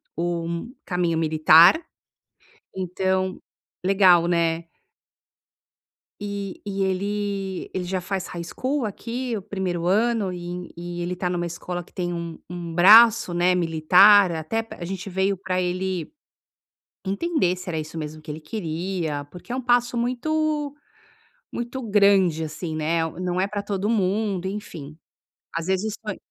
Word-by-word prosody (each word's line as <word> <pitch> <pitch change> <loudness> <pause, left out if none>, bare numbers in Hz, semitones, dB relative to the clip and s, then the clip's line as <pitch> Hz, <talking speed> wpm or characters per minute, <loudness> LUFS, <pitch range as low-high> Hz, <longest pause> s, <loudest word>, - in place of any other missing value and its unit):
um 170 +4 -3
caminho 175 -3 0
militar, 160 - +6 0.9
então 190 0 -1 0.4
Legal, 185 -3 +5
né? 170 -1 +1 1.5
E 200 -2 -5
e 195 -1 -3
ele 195 0 -2
ele 185 - -2
já 185 +1 -2
faz 190 +1 -4
High 170 -1 -6
School 260 - -2
aqui, 235 +4 -4
o 205 - -4
1º 185 -4 -3
ano, 215 +1 +2
e 175 0 -6
e 175 0 -6
ele 175 +1 -2
tá 180 0 -2
em 180 - -2
uma 175 0 -1
escola 175 +1 -5
que - - -24
tem 175 -1 -3
um 170 -1 -6
um 175 -1 -6
braço, 205 +2 +7
né, 175 +1 +3
militar, 180 +4 +6
até 165 +8 -2
pr 225 - -11
A 170 - -5
gente 190 +2 -5
veio 190 +1 +1
para 185 0 -2
ele 180 -1 -2 0.9
entender 195 - 0
se 180 +1 -9
era 165 -3 -2
isso 155 +1 -6
mesmo 155 0 -6
que 155 - -10
ele 150 +1 -6
queria, 165 -3 -3
porque 180 +6 -13
é - - -1
um - - -1
passo 245 0 +2
muito 295 +5 -1 0.8
muito 240 +2 -5
grande, 200 -6 +3
assim, 155 +1 -5
né? 160 +2 0 0.2
Não 180 0 -1
é 190 - +2
para 205 0 -3
todo 200 0 -2
mundo, 200 -3 0
enfim. 170 -7 -7 0.5
Às 165 0 -3
vezes 190 +3 -1
põe 210 -3 -5
185 Hz, 150 wpm, -24 LUFS, 170-205 Hz, 1.5 s, braço